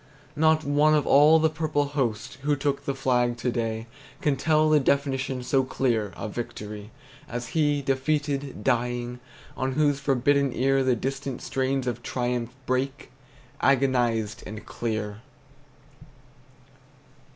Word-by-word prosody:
Not 155 +1 +3
one 150 +1 +3
of 150 - +2
all 150 +3 +6
the 160 0 +3
purple 155 -2 -1
host 125 -5 -2
Who 145 +1 +1
took 140 0 -2
the 140 - -1
flag 125 -2 +1
to 125 +1 -1
day 115 -1 -2 0.3
Can 145 -2 +1
tell 155 +3 +2
the 155 -1 +5
definition, 135 -2 0
So 135 +1 +2
clear, 115 -6 0
of 110 - -6
victory, 105 -3 -6 0.4
As 120 0 -5
he, 145 -3 +1
defeated, 140 -2 -1
dying, 120 +1 -1 0.4
On 130 0 -1
whose 145 0 +2
forbidden 140 0 +2
ear 135 +1 +2
The 130 -1 +2
distant 135 +2 -4
strains 135 0 -1
of 120 -1 -3
triumph 120 -1 -2 0.2
Break, 130 +2 -2 0.5
agonized 120 -5 +2
and 110 0 -8
clear! 110 -2 -4
135 Hz, 130 wpm, -26 LUFS, 120-145 Hz, 0.5 s, all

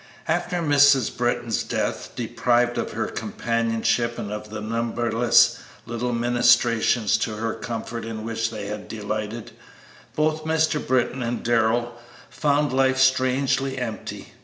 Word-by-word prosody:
After 180 -2 -1
Mrs. 145 -4 +4
Britton's 120 -2 0
death, - - -3
deprived 120 0 +1
of - - -3
her - - -1
companionship 115 0 -1
and 100 - -5
of 105 0 -6
the 110 0 -6
numberless 115 +1 +2 0.3
little 120 +1 -3
ministrations 120 -2 +3
to 110 - -2
her 110 +1 -2
comfort 115 0 -5
in 110 -1 -6
which 115 0 -1
they 105 -3 -6
had 105 +1 -6
delighted, 110 +1 -5 0.6
both 155 0 0
Mr. 160 -1 +1
Britton 130 0 0
and 120 0 -3
Darrell 120 +1 +1 0.4
found 145 -2 +1
life 130 0 +3
strangely 130 +1 +2
empty. 115 -4 -6
120 Hz, 130 wpm, -24 LUFS, 115-130 Hz, 0.6 s, Mrs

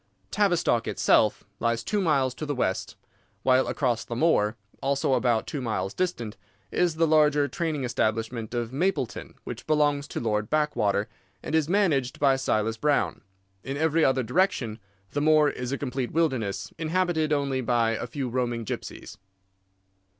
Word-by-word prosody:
Tavistock 175 - +2
itself 105 - +3 0.2
lies 115 -1 0
two 210 - 0
miles 140 -7 +2
to 155 +3 -6
the 145 - -1
west, 95 -6 -1 0.5
while 130 0 +4
across 125 -5 0
the 120 - -6
moor, 120 -7 +2 0.3
also 135 0 +1
about 120 -3 +2
two 145 - -4
miles 100 -5 -2
distant, 120 -12 -2 0.3
is 175 -3 +1
the 165 +1 +3
larger 150 -2 +4
training 155 0 -2
establishment 115 -1 -1
of 120 0 -2
Mapleton, 145 - -2
which 120 -1 -8
belongs 145 -2 +2
to - - -4
Lord 105 -2 -1
Backwater, 105 -10 +1 0.4
and - - -5
is 160 -1 +2
managed 160 -10 +1
by 135 -2 +4
Silas 115 -4 0
Brown. 145 +4 +1 0.4
In 135 +1 -4
every 160 +1 +2
other 130 -1 +3
direction 120 - 0 0.3
the 145 - -1
moor 155 -1 +5
is 125 -2 -5
a 140 - -1
complete 130 -2 -3
wilderness, 130 -11 -1
inhabited 165 -1 0
only 140 -3 0
by 120 -2 +2
a 115 +2 -3
few 130 +2 -4
roaming 120 -2 -2
gypsies. - - -6
135 Hz, 155 wpm, -26 LUFS, 115-155 Hz, 0.5 s, moor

